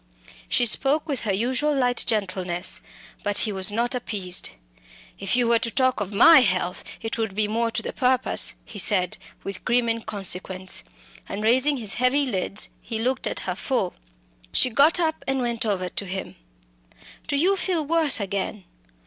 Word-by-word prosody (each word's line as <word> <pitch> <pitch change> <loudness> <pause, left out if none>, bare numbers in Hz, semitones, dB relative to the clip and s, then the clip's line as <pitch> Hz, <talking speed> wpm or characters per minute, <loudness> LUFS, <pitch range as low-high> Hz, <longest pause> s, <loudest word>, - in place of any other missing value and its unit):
She 240 - +2
spoke 280 +7 +2
with 275 -6 -3
her 205 - +1
usual 255 +9 0
light 245 -2 +2
gentleness, 185 -4 0 0.4
but 205 0 0
he 215 - +3
was 190 +1 +4
not 235 +4 0
appeased. 200 -7 -2 0.7
"If 195 +3 0
you 245 -1 +2
were 235 0 +4
to 230 - 0
talk 255 +2 +1
of 200 -1 -4
my 295 +10 +8
health, 185 -6 +1 0.2
it 225 +1 -4
would 220 -4 -2
be 210 0 +1
more 230 +2 0
to - - -2
the - - -4
purpose," 255 -1 +2
he 205 - -8
said, 185 -1 +1 0.3
with 195 - -6
grim 245 -1 +2
inconsequence. 195 -4 -2 0.5
And 210 - -4
raising 260 +6 +3
his 220 -4 -2
heavy 255 +4 +2
lids 200 -3 -1
he 225 - -4
looked 255 +4 -1
at - - -3
her 180 - -2
full. 205 -1 -2 0.6
She 255 - +2
got 285 +9 +4
up 320 -2 -1
and 270 0 0
went 235 -2 -2
over 185 -3 -1
to 200 - -4
him. 190 +1 -6 0.9
"Do 290 - -1
you 360 +8 +3
feel 355 -5 -1
worse 315 -4 +2
again? 200 0 -3
230 Hz, 175 wpm, -24 LUFS, 200-260 Hz, 0.9 s, my